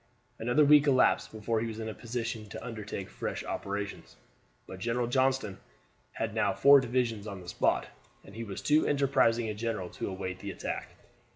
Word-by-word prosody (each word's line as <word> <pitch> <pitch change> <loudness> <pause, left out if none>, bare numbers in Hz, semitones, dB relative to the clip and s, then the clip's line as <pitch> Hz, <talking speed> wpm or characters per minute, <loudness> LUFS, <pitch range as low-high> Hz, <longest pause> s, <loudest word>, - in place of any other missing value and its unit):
Another 120 +6 +3
week 150 0 +6
elapsed 130 -2 +3
before 110 +1 -1
he 115 - -2
was 110 -1 -6
in 110 0 -4
a 110 - -4
position 115 -2 -4
to - - -7
undertake 105 -4 -5
fresh - - -4
operations; 100 0 -5 0.5
but 95 - -9
General 120 +3 0
Johnston 130 -5 +1 0.5
had - - -3
now - - +1
four 140 0 +8
divisions 120 -4 -1
on 100 -2 -6
the 90 - -12
spot, - - +1 0.4
and 95 - -13
he 115 +2 -5
was 100 -4 -6
too 150 +1 +3
enterprising 135 -5 +2
a 105 - -2
general 105 -4 -3
to - - -4
await 95 -1 -5
the 100 - -6
attack. - - -5
115 Hz, 180 wpm, -30 LUFS, 100-125 Hz, 0.5 s, four